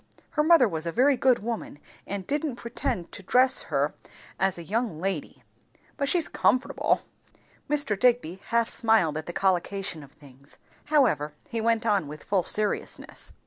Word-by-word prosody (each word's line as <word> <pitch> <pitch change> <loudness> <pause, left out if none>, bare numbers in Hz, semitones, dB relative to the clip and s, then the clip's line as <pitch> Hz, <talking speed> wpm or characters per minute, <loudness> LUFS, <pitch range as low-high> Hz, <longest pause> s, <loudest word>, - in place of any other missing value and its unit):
Her 300 - +1
mother 315 -5 +6
was 165 -3 -4
a - - -1
very 265 +8 +4
good 255 -1 +3
woman, 230 -9 -4 0.3
and 200 -2 -4
didn't 290 - -2
pretend 235 -6 -4
to - - -8
dress 255 +7 +4
her - - 0 0.5
as 190 -1 +1
a 170 - -7
young 215 -2 -2
lady. 185 -4 -4 0.5
But 280 -1 -1
she's 340 -2 +1
comfortable." 255 +2 +1 0.7
Mr. 285 -9 +1
Digby 235 -8 +2
half 235 -1 +2
smiled 220 -12 +2
at 155 0 -5
the - - -3
collocation 190 -2 -1
of 140 -1 -14
things, 140 0 -15 0.3
however 225 - +2 0.2
he 230 - -2
went 230 0 +1
on 200 -8 +1
with 150 +1 -9
full 195 -2 +1
seriousness. 210 +4 -2
215 Hz, 160 wpm, -26 LUFS, 170-250 Hz, 0.7 s, mother